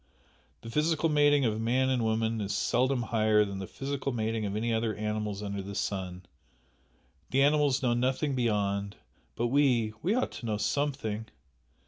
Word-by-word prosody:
The 115 - -8
physical 160 +3 +1
mating 145 -2 +4
of 110 -1 0
man 130 +3 +2
and 125 -3 +1
woman 110 0 0
is 100 0 -2
seldom 125 +4 +1
higher 110 -2 +3
than 100 -1 -5
the 95 - -5
physical 140 0 -3
mating 110 -2 -1
of 100 - -4
any 115 +2 0
other 110 -1 0
animals 105 -1 -3
under 100 -1 -3
the 100 +1 -7
sun, 95 -2 -3 1.0
the 135 +1 +3
animals 145 -2 +3
know 120 -2 +3
nothing 130 +4 0
beyond 100 -5 0 0.4
but 120 0 0
we 125 -5 +2
we 195 +7 +1
ought 255 - 0
to 120 - -7
know 105 -1 0
something!" 110 -2 -1
115 Hz, 165 wpm, -29 LUFS, 105-135 Hz, 1.0 s, mating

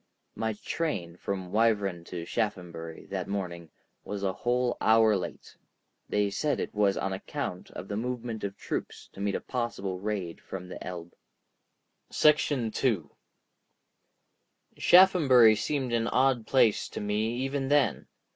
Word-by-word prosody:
My 110 -1 -2
train 105 - -3
from 95 -1 -4
Wyvern 105 -6 +1
to 85 -1 -6
Shaphambury 85 -5 -4
that - - -3
morning 85 -4 -4 0.3
was 100 -1 -5
a 95 -1 0
whole 120 +3 0
hour 110 -1 +5
late; 90 - -6 0.5
they 105 -1 +1
said 145 +9 0
it - - -3
was 100 -2 +2
on 95 - -1
account 95 - -5
of 90 - -8
the 100 - -4
movement 120 0 -4
of 100 0 -4
troops - - -5
to - - -12
meet 100 0 0
a - - -1
possible 100 -7 -3
raid 95 -4 -4
from 90 -1 -7
the - - -7
Elbe. 85 -1 -7 1.0
§ 145 -6 +3
2 100 - 0 1.6
Shaphambury 145 - +6
seemed 130 +1 -2
an 115 -1 +1
odd 130 -3 +2
place 115 -6 +3
to - - -6
me 105 +3 -1
even 135 +2 -2
then. 145 0 +2
105 Hz, 140 wpm, -28 LUFS, 95-125 Hz, 1.6 s, Shaphambury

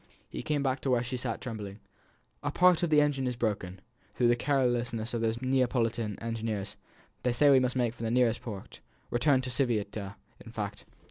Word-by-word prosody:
He - - -6
came 145 -2 -1
back 130 0 0
to 135 - -2
where 125 -2 +3
she 125 +1 -4
sat 125 -2 -3
trembling. 105 -4 -6 0.6
"A 145 - -1
part 180 +3 +4
of 175 - +1
the 150 -1 +5
engine 140 -3 +1
is 125 - -1
broken, 100 -5 -2 0.3
through 120 -1 +3
the 120 - +5
carelessness 120 -4 0
of 115 - -1
these 115 +2 -1
Neapolitan 120 -5 +1
engineers; 110 -3 -3 0.5
they 125 - +1
say 140 +4 +5
we 135 - +7
must 125 0 0
make 120 -3 +1
for 120 - -13
the 115 - -1
nearest 120 -1 +2
port 100 -5 -8 0.3
return 130 +2 +3
to 125 0 -4
Civita, 105 -5 -1 0.3
in 115 - -11
fact." 105 -2 -5
120 Hz, 195 wpm, -30 LUFS, 110-130 Hz, 0.6 s, we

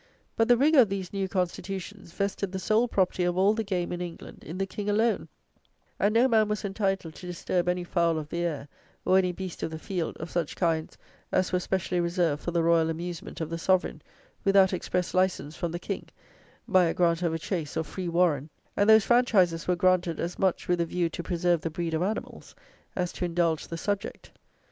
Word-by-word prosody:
But 225 - +2
the 245 -1 +6
rigour 290 +3 +5
of 230 -6 +6
these 190 -2 -4
new 195 -1 -1
constitutions 190 +1 -4
vested 200 0 -2
the 190 - -3
sole 220 +5 +2
property 185 -4 +1
of 175 0 0
all 195 +3 +4
the 225 0 -1
game 185 -4 -2
in 175 0 -3
England 175 -2 -8
in 165 +4 -7
the 195 - 0
King 205 +2 -5
alone; 220 +3 +1 0.7
and 205 - +3
no 235 +4 +4
man 220 -3 +3
was 210 0 -2
entitled 195 -4 -1
to 180 - -10
disturb 180 0 -1
any 180 0 0
fowl 170 -2 +1
of 150 -1 -5
the 170 - -3
air, 160 -5 -2 0.4
or 190 +1 +5
any 180 -1 +1
beast 185 -1 -7
of - - -2
the 160 - -6
field, 175 0 -3
of 160 +1 -7
such 170 -4 -2
kinds 165 -3 -1 0.3
as 185 0 +1
were 180 - +3
specially 185 -1 -1
reserved 170 -3 0
for - - -3
the 170 -1 +1
royal 165 -1 +3
amusement 170 +1 -5
of 160 0 -3
the 165 - -3
Sovereign, 185 +2 +1 0.4
without 195 -1 +5
express 180 0 -2
license 185 -5 0
from 170 0 -3
the 170 - -3
King, 195 +3 -5 0.6
by 185 -1 +5
a 165 - 0
grant 170 -1 +2
of 170 -2 +1
a 165 - -1
chase 165 -2 -4
or 160 - +1
free 175 +3 -5
warren: 165 -4 +2 0.3
and 205 +2 +3
those 220 -1 +7
franchises 200 -9 +3
were 180 - +3
granted 180 -2 +2
as 175 +1 -3
much 190 -2 +1
with 175 -1 +2
a - - +1
view 175 0 0
to - - -5
preserve 175 -1 +1
the 165 - -2
breed 165 +1 -3
of 160 - 0
animals, 205 +4 -4 0.4
as 180 -1 -1
to - - -5
indulge 170 -2 0
the 165 - -5
subject. 200 +3 -4
180 Hz, 215 wpm, -27 LUFS, 170-195 Hz, 0.7 s, those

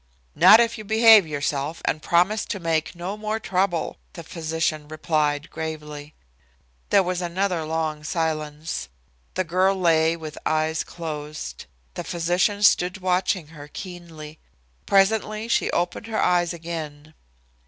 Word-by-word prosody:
"Not 220 - +8
if 230 -1 +1
you - - -7
behave 220 -3 +6
yourself 145 +1 -2
and 155 - 0
promise 180 +7 +2
to 205 - -4
make 165 -1 -1
no 180 +4 -4
more 215 +1 -3
trouble," 185 -4 -1 0.2
the 170 - -9
physician 160 -2 -2
replied 155 -1 -1
gravely. 150 -2 -6 0.7
There 200 -1 +5
was 180 0 -2
another 180 -1 -1
long 155 -1 -2
silence. 155 - -3 0.5
The 185 - +1
girl 185 +3 +2
lay 165 -2 +2
with 155 -2 -8
eyes 155 +1 0
closed. 150 - -7 0.3
The - - -5
physician 180 +4 0
stood 180 -1 +4
watching 185 -3 0
her 150 -2 -11
keenly. 165 -3 -9 0.5
Presently 215 +2 +2
she 235 - +1
opened 175 +5 -2
her 220 -1 -2
eyes 175 -1 +2
again. 160 -3 -7
170 Hz, 130 wpm, -24 LUFS, 155-190 Hz, 0.7 s, Not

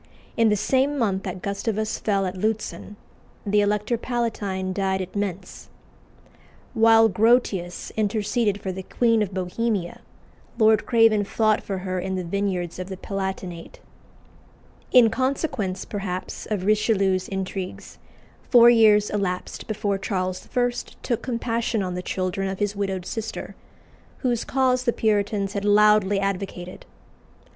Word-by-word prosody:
In 230 -1 +4
the 210 - +3
same 265 +7 +1
month 200 -6 0
that 185 -1 -5
Gustavus 215 +2 -2
fell 200 -2 0
at 185 - -3
Lutzen, 215 +1 -3 0.5
the 205 0 +3
Elector 210 +3 0
Palatine 205 -7 -2
died 190 0 0
at 185 +1 -6
Mentz. 195 -2 -4 1.1
While 225 0 +6
Grotius 210 -5 +1
interceded 210 0 0
for 190 - -4
the 190 +1 -6
Queen 230 +3 +1
of 205 -2 -1
Bohemia, 185 0 -2 0.6
Lord 220 -1 +4
Craven 225 -3 +4
fought 215 +1 +1
for 195 - -4
her 185 0 -3
in 190 +1 -3
the 185 - -2
vineyards 180 -1 -2
of 185 +1 -5
the 190 - -6
Palatinate. 190 -3 -5 1.1
In 235 -3 +6
consequence, 250 - -2
perhaps, 190 -3 -5
of 200 -4 -2
Richelieu's 200 -3 +2
intrigues, 190 -1 -5 0.5
four 240 -1 +8
years 215 -3 +5
elapsed 195 -3 -3
before 205 -2 -1
Charles 185 -2 -3
I. 245 -1 +3 0.3
took 235 - -1
compassion 230 -3 -1
on 180 -1 -3
the 180 - -3
children 185 +1 -2
of 190 - -4
his 205 0 -1
widowed 195 -2 -3
sister, 225 +2 -5 0.6
whose 240 -4 -1
cause 255 -1 +1
the 235 - +2
Puritans 205 -2 0
had 200 - -3
loudly 205 -1 +4
advocated. 195 -2 -4
205 Hz, 135 wpm, -24 LUFS, 190-225 Hz, 1.1 s, four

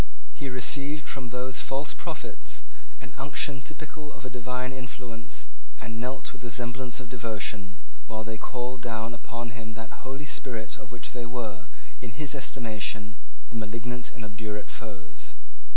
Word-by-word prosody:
He 140 - 0
received 140 +4 +4
from 130 -3 0
those 125 +1 +3
false 140 +2 +3
prophets - - 0 0.4
the - - -7
unction 135 -2 +3
typical 150 +3 -5
of 140 -2 -7
a 130 - 0
divine 125 +1 +2
influence, 125 -3 -3 0.3
and 115 0 -1
knelt 130 +2 +1
with - - -8
the 120 - 0
semblance 120 +1 +2
of 130 - -2
devotion, 110 -4 +1 0.3
while 110 -1 +1
they 110 -1 0
called 125 0 +1
down 115 -1 +2
upon 120 0 -1
him 110 -1 -3
that 115 0 -4
Holy 135 +3 -1
Spirit 115 -6 0
of 130 - -6
which 120 -1 -2
they 120 -1 0
were, 105 -6 0 0.3
in 125 - -1
his 150 -1 +2
estimation, 110 -5 +2 0.4
the - - -4
malignant 115 +3 +1
and 115 - -2
obdurate 105 0 -1
foes. 100 -6 -5
120 Hz, 155 wpm, -34 LUFS, 110-130 Hz, 0.4 s, received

